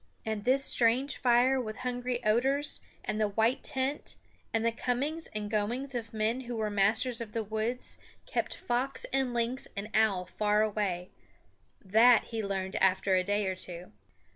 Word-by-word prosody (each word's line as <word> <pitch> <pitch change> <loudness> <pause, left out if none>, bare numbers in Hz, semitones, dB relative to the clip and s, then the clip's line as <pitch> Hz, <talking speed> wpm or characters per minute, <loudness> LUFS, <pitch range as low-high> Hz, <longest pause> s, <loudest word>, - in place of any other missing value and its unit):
And 220 -2 -3
this 270 +2 +4
strange 250 +4 +3
fire 255 +2 +3
with 215 -2 -6
hungry 245 -1 -3
odors, 265 +7 +1 0.2
and 215 - -2
the 215 - +3
white 225 +6 +1
tent, 270 +1 +1 0.4
and 225 -1 0
the 230 - +3
comings 270 +7 -2
and 210 -1 -2
goings 230 +6 -1
of 230 -2 -4
men 220 +3 0
who 245 -1 -5
were 215 -1 -1
masters 220 +5 +2
of 215 -2 -7
the 225 - -1
woods 220 +4 -3 0.3
kept - - -2
fox 250 +3 -2
and 265 -2 +1
lynx 240 +2 -1
and 210 +2 -5
owl 210 -4 +2
far 210 +2 +1
away 200 -4 -2 0.7
that 225 +4 +6
he 225 -2 -3
learned 190 -1 -3
after 190 0 +2
a 185 0 +3
day 205 +2 0
or 190 - 0
two. 180 -1 -6
225 Hz, 165 wpm, -30 LUFS, 210-250 Hz, 0.7 s, that